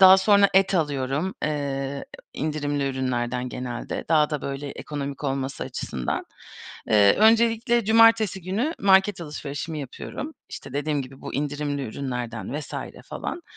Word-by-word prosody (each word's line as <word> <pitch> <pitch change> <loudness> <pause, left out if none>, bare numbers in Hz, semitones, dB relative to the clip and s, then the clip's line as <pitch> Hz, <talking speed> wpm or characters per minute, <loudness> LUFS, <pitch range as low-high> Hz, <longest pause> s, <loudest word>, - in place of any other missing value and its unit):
Daha 190 0 +10
sonra 200 0 +5
et 195 0 +4
alıyorum, 145 +2 0
eee, 140 -2 -2 0.3
indirimli 145 -2 -1
ürünlerden 125 -1 -1
genelde. 125 -1 -5
Daha 155 -1 +4
da 150 - -2
böyle 140 +1 -4
ekonomik 140 -1 -5
olması 135 0 -2
açısından. 65 -2 -3 0.6
Eee, 100 -2 +6
öncelikle 230 +1 +4
cumartesi 220 -3 +5
günü 220 - -1
market 195 -1 +4
alışverişimi 150 0 -5
yapıyorum. 270 - -6 0.2
İşte, 135 - -8
dediğim 145 0 -1
gibi 130 +1 -12
bu - - -6
indirimli 145 0 -2
ürünlerden 125 +1 -4
vs. - - -9 0.3
falan. 345 - -5
145 Hz, 130 wpm, -25 LUFS, 135-190 Hz, 0.6 s, Daha